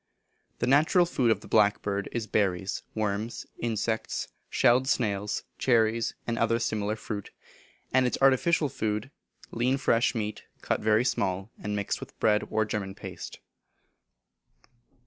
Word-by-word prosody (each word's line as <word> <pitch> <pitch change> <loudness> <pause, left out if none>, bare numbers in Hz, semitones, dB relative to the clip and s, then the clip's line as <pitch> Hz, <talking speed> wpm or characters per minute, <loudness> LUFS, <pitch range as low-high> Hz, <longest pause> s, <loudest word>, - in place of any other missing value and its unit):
The - - 0
natural 155 +7 +4
food 130 -8 +1
of 110 -2 +2
the - - -12
blackbird 100 -2 +2
is 120 -2 -2
berries, 95 -3 0
worms, 110 +1 -2
insects, 110 -1 -2 0.2
shelled 125 +2 +3
snails, 105 -5 0 0.2
cherries, 115 -2 +2
and 115 -1 -2
other 115 0 +2
similar 110 -2 -1
fruit; 105 -2 -6 0.6
and 130 -1 +4
its - - -1
artificial 140 +4 +4
food, 110 0 -3 0.4
lean 125 +3 +1
fresh 120 -2 +2
meat, 105 -1 -3 0.2
cut - - 0
very 110 +2 +3
small, 100 -4 -1
and 105 0 -2
mixed 100 -1 -2
with - - -11
bread, 105 -1 +2
or 110 0 +1
German 100 -2 -4
paste. - - -8
110 Hz, 135 wpm, -28 LUFS, 105-120 Hz, 0.6 s, natural